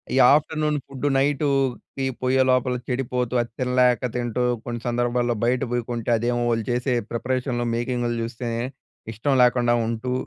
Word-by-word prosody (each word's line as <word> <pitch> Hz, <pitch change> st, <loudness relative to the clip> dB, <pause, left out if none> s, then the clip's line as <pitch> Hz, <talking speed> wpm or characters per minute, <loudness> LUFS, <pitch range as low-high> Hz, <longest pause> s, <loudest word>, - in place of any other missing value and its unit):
ఈ -, -, +2 dB, 0.2 s
afternoon 155 Hz, 0 st, +1 dB
food 140 Hz, +1 st, -3 dB
నైటుకి 135 Hz, -2 st, 0 dB, 0.2 s
పోయే 130 Hz, +1 st, +2 dB
లోపల 130 Hz, 0 st, +2 dB
చెడిపోతూ, 125 Hz, -1 st, -2 dB
అది 120 Hz, -, -6 dB
తినలేక 125 Hz, -1 st, +2 dB
తింటూ 120 Hz, 0 st, -1 dB, 0.2 s
కొన్ని 120 Hz, -1 st, -4 dB
సందర్భాల్లో 120 Hz, 0 st, 0 dB
బయట 125 Hz, +2 st, +2 dB
పోయి 120 Hz, -1 st, 0 dB
కొంటే 120 Hz, -1 st, -3 dB
అదేమో 120 Hz, +1 st, 0 dB
వాళ్ళు 115 Hz, -1 st, 0 dB
చేసే 125 Hz, +1 st, 0 dB, 0.2 s
ప్రిపరేషన్‍లో 125 Hz, 0 st, -1 dB
మేకింగులు 120 Hz, 0 st, -1 dB
జూస్తే 115 Hz, +1 st, -5 dB, 0.7 s
ఇష్టం 135 Hz, +6 st, 0 dB
లేకుండా 120 Hz, -1 st, +3 dB
ఉంటూ, 115 Hz, +2 st, -2 dB
125 Hz, 140 wpm, -23 LUFS, 120-130 Hz, 0.7 s, లేకుండా